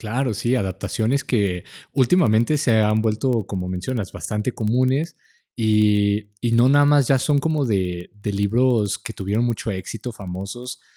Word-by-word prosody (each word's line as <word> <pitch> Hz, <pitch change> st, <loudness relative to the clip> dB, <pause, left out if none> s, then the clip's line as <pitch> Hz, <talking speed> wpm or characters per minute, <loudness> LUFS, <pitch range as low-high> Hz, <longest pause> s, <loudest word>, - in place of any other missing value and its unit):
Claro, 120 Hz, +2 st, -2 dB
sí, 120 Hz, +5 st, 0 dB
adaptaciones 110 Hz, +6 st, -1 dB
que 100 Hz, -7 st, 0 dB, 0.3 s
últimamente 130 Hz, -2 st, +3 dB
se 115 Hz, -5 st, +3 dB
han 105 Hz, +1 st, +2 dB
vuelto, 110 Hz, 0 st, 0 dB
como 95 Hz, -2 st, -4 dB
mencionas, 95 Hz, +3 st, -4 dB
bastante 105 Hz, +4 st, -3 dB
comunes, 130 Hz, +9 st, 0 dB, 0.4 s
y 105 Hz, -1 st, +2 dB
y 120 Hz, -1 st, 0 dB
no 120 Hz, +2 st, +5 dB
nada 145 Hz, +1 st, +5 dB
más 145 Hz, -3 st, +4 dB
ya 135 Hz, -, +4 dB
son 145 Hz, +2 st, +1 dB
como 155 Hz, 0 st, 0 dB
de 90 Hz, -6 st, -2 dB
de 105 Hz, 0 st, -5 dB
libros 105 Hz, +1 st, +1 dB
que 115 Hz, +1 st, -8 dB
tuvieron 105 Hz, +5 st, -1 dB
mucho 115 Hz, -1 st, -2 dB
éxito, 105 Hz, +5 st, -6 dB
famosos, 105 Hz, +6 st, -7 dB
110 Hz, 155 wpm, -22 LUFS, 100-130 Hz, 0.4 s, no